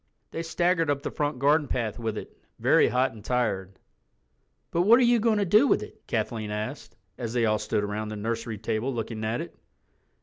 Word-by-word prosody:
They 165 - -3
staggered 165 0 +1
up 140 -1 0
the - - -3
front 145 -2 -2
garden 145 +3 +3
path 115 -3 -2
with 110 -2 -3
it, - - -8 0.2
very - - +4
hot 130 +1 +1
and 110 -2 -13
tired. 100 -6 -1 0.9
"But 170 - +2
what 225 +7 +6
are - - +4
you 240 -1 +4
going 220 -1 +2
to 205 - +1
do 210 +9 +5
with - - +2
it?" - - -12
Kathleen 110 -1 -2
asked, 110 +2 -5 0.2
as 115 -2 -4
they 120 -2 +2
all 110 -1 +2
stood 105 - -1
around 105 +1 -3
the 110 - -5
nursery 115 +1 -3
table 110 +4 -2
looking 115 -2 -4
at 110 +2 -1
it. - - -8
120 Hz, 205 wpm, -27 LUFS, 110-155 Hz, 0.9 s, what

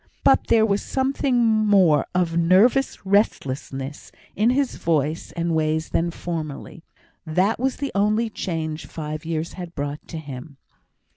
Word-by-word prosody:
But - - +4
there 220 -1 +4
was 205 -1 +1
something 265 -2 +1
more 205 -8 +4
of 175 -2 +1
nervous 195 +11 +3
restlessness 140 - -1 0.2
in 215 +4 +3
his 265 +1 0
voice 155 -1 -1
and 170 -1 -1
ways 155 0 0
than 170 +1 0
formerly; 165 -1 -6 0.4
that 185 +8 +1
was 260 +1 0
the 280 -1 -4
only 210 +3 +2
change 160 -6 -4
six 155 0 -6
years 165 0 -3
had 175 -2 -8
brought 145 0 -5
to 165 - -6
him. 140 -2 -9
170 Hz, 140 wpm, -23 LUFS, 155-215 Hz, 0.4 s, But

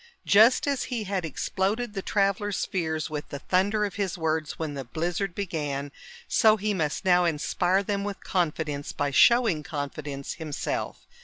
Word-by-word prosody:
Just 230 +9 +6
as 280 -2 0
he 240 -4 -3
had 195 -3 -2
exploded 200 - -2
the 195 - -3
travelers' 200 0 0
fears 160 -4 -2
with 150 -1 -5
the 140 - -5
thunder 200 +7 +1
of 200 - -6
his 195 -2 -1
words 160 -2 -1
when 155 -2 -3
the 135 -1 -5
blizzard 170 +8 -2
began, 145 -7 -3 0.4
so 220 -2 +5
he 210 +1 -1
must 160 0 -2
now 180 -1 +5
inspire 175 +4 +1
them 200 0 -2
with 200 -1 -5
confidence 155 -5 -1
by 145 -1 -1
showing 225 - +5
confidence 145 -2 -5
himself. 155 -2 -4
180 Hz, 160 wpm, -27 LUFS, 150-200 Hz, 0.4 s, Just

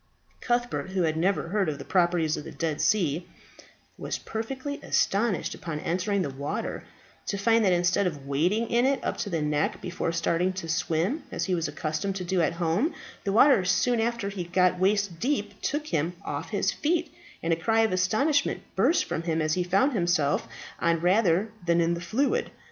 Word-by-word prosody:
Cuthbert, 240 -5 -1
who 185 -2 +1
had 160 -1 +1
never 175 +1 0
heard 195 -3 +1
of 145 - -3
the 140 - -9
properties 170 -4 +2
of - - -6
the - - -8
Dead 160 -3 -2
Sea, 175 -5 +1 0.7
was - - -3
perfectly 260 +6 -5
astonished 200 -1 +1
upon 160 -3 -5
entering 185 +5 0
the 140 - -3
water 140 +2 -4 0.4
to 200 - -1
find 225 +3 +3
that 190 - +4
instead 180 +2 +2
of 145 -6 -5
wading 175 +12 0
in 240 +2 +3
it 275 -1 +1
up - - -1
to 205 - -3
the 165 -4 -1
neck 150 0 0
before 175 -2 -3
starting 170 +2 0
to 185 -3 -6
swim, 165 - 0
as - - -2
he 190 - -1
was 170 -2 0
accustomed 160 +5 -3
to 190 - -3
do 180 0 +1
at 165 - +1
home, 175 - 0 0.3
the 200 - +1
water 235 0 +6
soon 225 +5 +2
after 230 -3 -1
he 195 -3 -4
got 180 +1 +2
waist 195 -2 +1
deep 210 -6 -2
took 295 +2 -1
him 165 - -1
off 145 +4 -4
his 200 -3 +1
feet, 335 +1 -1 0.3
and 165 0 +2
a - - +3
cry 225 +7 +2
of 225 - +2
astonishment 215 +12 +1
burst 255 - +3
from - - -3
him 165 -1 -1
as 155 -1 +1
he 180 - +1
found 195 +11 +2
himself 175 -7 +1 0.3
on 170 -1 +2
rather 185 +2 +2 0.2
than 170 0 +3
in 170 0 +2
the 170 - -4
fluid. 275 - 0
185 Hz, 195 wpm, -27 LUFS, 165-220 Hz, 0.7 s, water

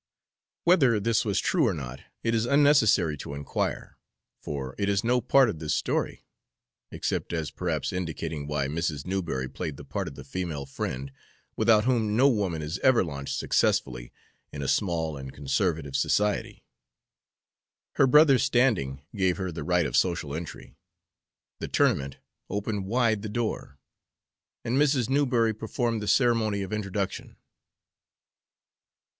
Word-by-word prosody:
Whether 135 - +4
this 115 +2 +1
was 100 -3 0
true 165 -8 +2
or 100 - 0
not 65 -3 -7 0.2
it 115 - +1
is 115 +1 +1
unnecessary 140 - +4
to 70 - -7
inquire, 70 0 -3 0.4
for 65 -2 -5
it 100 0 +1
is 100 -1 +1
no 125 +1 +2
part 130 +2 +5
of 90 -8 -4
this 75 -1 -1
story, - - -2 0.6
except - - -3
as 80 -2 -2
perhaps - - -2
indicating 80 -4 -4
why 75 -2 -1
Mrs. 80 -1 -2
Newberry 85 -9 -2
played 70 +2 -5
the - - -10
part - - -3
of - - -8
the 70 - -9
female 75 -1 -4
friend, 65 0 -5 0.4
without 110 -1 +4
whom 110 -4 +1
no 135 +3 +6
woman 100 - 0
is 80 +5 -4
ever 130 -5 +4
launched 70 -5 -4
successfully - - 0 0.4
in 70 - -5
a - - -3
small 80 -5 0
and 65 -1 -8
conservative 75 0 -1
society. 105 +8 0 1.3
Her 135 - +5
brother's 140 -2 +6
standing 115 - +1
gave 95 -3 +1
her 95 -2 -3
the 80 - -6
right 90 +2 +2
of 60 - -2
social 85 -6 +1
entry; 85 +2 -7 0.9
the - - -4
tournament 70 -1 +1 0.3
opened 100 -1 -3
wide 115 -1 +1
the 110 - -5
door, 110 - -3 0.9
and 125 +4 +1
Mrs. 135 -5 +2
Newberry 125 -5 +2
performed 115 0 -2
the 105 - -5
ceremony 110 -5 +2
of 95 - -6
introduction. 100 -2 -3
95 Hz, 145 wpm, -27 LUFS, 75-115 Hz, 1.3 s, no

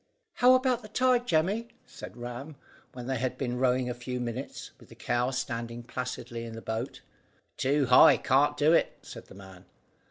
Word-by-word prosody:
"How 250 +1 +6
about 255 -2 +1
the 215 - -11
tide, 245 +2 +2
Jemmy?" 190 +8 +1 0.2
said - - -11
Ram, 125 +5 -7 0.4
when 125 -1 -8
they 130 -1 -2
had 130 0 -2
been 125 -2 -3
rowing 125 -1 +2
a 125 - -2
few 125 +1 -5
minutes, 125 +2 -6
with - - -18
the - - -14
cow 120 +1 -1
standing 120 -2 -4
placidly 120 -1 -5
in 115 -1 -7
the - - -6
boat. 110 +3 -4 0.5
"Too 140 +1 +1
high, 125 0 +7
can't 135 +3 +2
do 155 +2 +4
it," - - +2
said - - -11
the - - -14
man. 95 -2 -13
125 Hz, 185 wpm, -28 LUFS, 120-155 Hz, 0.5 s, high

